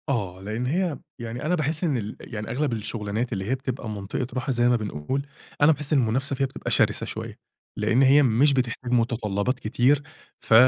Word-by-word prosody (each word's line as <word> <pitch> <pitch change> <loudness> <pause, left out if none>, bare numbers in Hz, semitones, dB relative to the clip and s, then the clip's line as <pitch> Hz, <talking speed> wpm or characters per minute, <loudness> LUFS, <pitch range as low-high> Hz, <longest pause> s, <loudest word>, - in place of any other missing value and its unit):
آه، 100 -9 -1
لأن 110 +5 -3
هي 165 +2 0 0.2
يعني 120 +3 -5
أنا 175 +3 +2
باحس 155 +1 -1
إن 150 -7 +2
ال 105 -2 -4
يعني 105 -2 -6
أغلب 130 +2 0
الشغلانات 110 +1 -2
اللي 95 -2 -3
هي 130 - +2
بتبقى 130 -3 -4
منطقة 105 +4 -3
راحة- 130 +2 -1
زي 120 -1 +3
ما 125 - +4
بنقول- 105 - -2 0.4
أنا 145 +2 +7
باحس 150 0 -1
المنافسة 135 +1 +1
فيها 135 - +1
بتبقى 135 - -5
شرسة - - +2
شويّة؛ - - -5 0.4
لأن 120 +3 +2
هي 140 +2 +7
مش 135 +4 +4
بتحتاج 125 -1 -1
متطلبات 115 -1 +1
كتير، 130 +5 +2 0.4
ف - - -1
125 Hz, 185 wpm, -25 LUFS, 110-140 Hz, 0.4 s, أنا